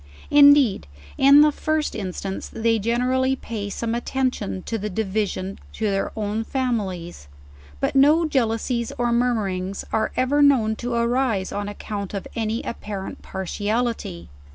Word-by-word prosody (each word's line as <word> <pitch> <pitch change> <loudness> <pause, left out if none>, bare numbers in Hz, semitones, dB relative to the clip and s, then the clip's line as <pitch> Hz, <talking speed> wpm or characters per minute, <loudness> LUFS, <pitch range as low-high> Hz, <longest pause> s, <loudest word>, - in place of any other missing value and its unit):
Indeed, 285 - +6 0.3
in 280 +2 +7
the 300 0 +6
first 310 +1 -1
instance 190 -1 -5
they 225 0 +1
generally 255 +4 +1
pay 215 -5 -5
some 225 +3 -3
attention 240 -6 -2
in 225 -3 -2
the 210 - -2
division 195 -1 -2
to 220 - -3
their 195 0 -1
own 215 0 -2
families; 195 - -3 0.5
but - - 0
no 300 +5 +5
jeal 265 -7 +2
ousies 235 +1 -2
or 240 -1 +1
murmurings 200 -6 -1
are 220 0 +1
ever 275 +3 +2
known 245 -7 +4
to 245 0 -3
arise 235 -4 0
on 205 0 -3
account 205 -1 -5
of 195 - -5
any 225 0 -2
apparent 205 -4 -6
partiality. 205 - -3
225 Hz, 140 wpm, -23 LUFS, 200-255 Hz, 0.5 s, in